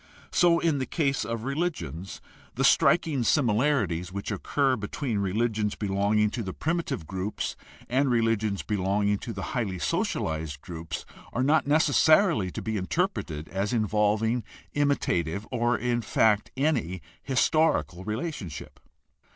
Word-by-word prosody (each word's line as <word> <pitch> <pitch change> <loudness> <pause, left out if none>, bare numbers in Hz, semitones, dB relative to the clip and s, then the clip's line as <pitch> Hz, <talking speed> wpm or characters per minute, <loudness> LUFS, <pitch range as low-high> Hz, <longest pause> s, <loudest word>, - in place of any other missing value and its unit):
So 170 -1 +4
in 160 -4 +1
the 130 - -2
case 140 -5 0
of 115 -1 -4
religions; 135 - -3 0.3
the - - 0
striking 145 -6 +4
similarities 110 - +1
which 100 +3 -4
occur 130 +6 +1
between 110 +1 -3
religions 105 +2 0
belonging 105 +1 +1
to 120 - -3
the 95 -4 -4
primitive 160 - -2
groups 95 +4 -3 0.3
and 135 +2 +2
religions 115 -4 +1
belong 100 0 0
ing 105 -1 +1
to 120 - -6
the 95 -3 -5
highly 105 -7 -1
socialized 80 -4 -2
groups 80 -4 -6 0.3
are 125 - 0
not 150 +1 +3
necessarily 155 - +4
to - - -6
be 110 -1 -2
interpreted 95 - -2
as 100 +4 -2
involving 110 +1 +1 0.3
imitative, 105 - 0
or 120 -1 +1
in 120 -1 0
fact 110 -2 +2
any, 125 - 0 0.2
historical 135 - +1
relationship. 110 - -5
110 Hz, 130 wpm, -27 LUFS, 95-140 Hz, 0.3 s, So